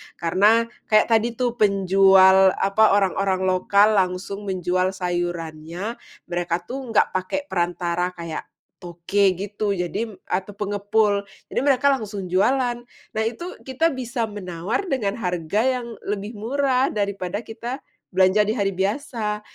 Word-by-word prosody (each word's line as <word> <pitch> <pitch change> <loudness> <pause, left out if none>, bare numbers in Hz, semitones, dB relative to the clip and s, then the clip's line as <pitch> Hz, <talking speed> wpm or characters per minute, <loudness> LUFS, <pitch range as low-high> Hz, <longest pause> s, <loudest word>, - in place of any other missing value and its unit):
Karena, 200 +7 +3 0.2
kayak 215 +2 +3
tadi 230 +1 +2
tuh 245 -1 -1
penjual, 190 -1 +5
apa, 200 +1 +3
orang-orang 195 -1 +1
lokal 200 +3 +3
langsung 190 +2 -3
menjual 185 0 0
sayurannya, 175 +2 -4 0.3
mereka 175 0 -1
tuh 255 +9 -6 0.2
nggak - - +4
pakai 185 +10 -2
perantara 175 0 -1
kayak, 170 -2 -6 0.3
toke 180 +2 0
gitu, 205 +1 -2
jadi 180 +6 -3 0.2
atau 190 +2 -2
pengepul 205 0 +1 0.3
jadi - - 0
mereka 280 -1 +3
langsung 210 -7 -3
jualan. 245 +5 +2 0.4
Nah 220 - +1
itu, 245 +11 -5
kita 320 +6 +1
bisa 245 -3 -3
menawar 200 - -3
dengan 220 - -1
harga 180 0 -1 0.2
yang 235 -1 -8
lebih 205 +2 -4
murah 260 +3 +1
daripada 200 -2 -2
kita 240 +4 -6 0.3
belanja 190 +2 +4
di 215 - 0
hari 200 -4 0
biasa. 210 +1 -2
200 Hz, 130 wpm, -23 LUFS, 185-225 Hz, 0.4 s, penjual